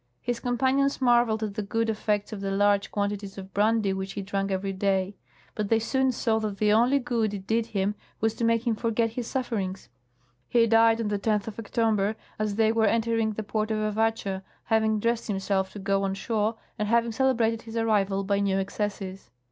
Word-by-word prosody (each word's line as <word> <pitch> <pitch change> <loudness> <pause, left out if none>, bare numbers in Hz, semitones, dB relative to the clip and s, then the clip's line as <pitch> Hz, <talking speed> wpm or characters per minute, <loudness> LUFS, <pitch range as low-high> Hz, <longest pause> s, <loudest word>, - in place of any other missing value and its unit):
His 245 -1 -3
compan 260 +2 +1
ions 275 0 +1
marveled 240 -3 +3
at 210 -2 -3
the 215 - -3
good 225 +3 -1
effects 210 -1 -1
of 200 - -6
the 195 - -2
large 200 0 +2
quantities 200 -1 -3
of 190 0 -9
brandy 210 -1 +2
which 190 0 -4
he 200 - -4
ch 200 - -15
ank 195 0 0
every 195 0 -2
day; 195 0 0 0.4
but 210 -2 -3
they 225 - +4
soon 265 +4 +1
saw 225 -2 0
that 210 -2 -3
the 210 0 +3
only 245 +5 +4
good 230 -5 -1
it 190 -1 -8
did 225 +2 0
him 200 -1 -1 0.3
was 220 0 +1
to 230 - -5
make 230 +1 +2
him 235 - +2
forget 230 0 0
his 235 0 -4
sufferings. 210 -8 -3 0.6
He 235 -1 +4
died 225 0 +4
on 220 -2 -1
the 205 -1 -1
10th 210 -1 0
of 220 - -10
October, 220 -2 0 0.2
as 215 -1 -1
they 220 0 +3
were 225 -1 +2
entering 225 0 +1
the 220 - -4
port 215 +1 -2
of 220 - 0
Avatscha, 215 -2 0 0.2
having 220 -1 +2
dressed 230 +2 0
himself 195 -2 -1
to - - -8
go 195 0 0
on 195 -1 -1
shore 215 +2 -1 0.2
and 210 - 0
having 235 +1 +2
celebrated 230 -2 +1
his 225 0 -7
arrival 200 -3 +1
by 200 0 +1
new 195 -1 +1
excesses. 195 - -4
215 Hz, 210 wpm, -27 LUFS, 200-230 Hz, 0.6 s, they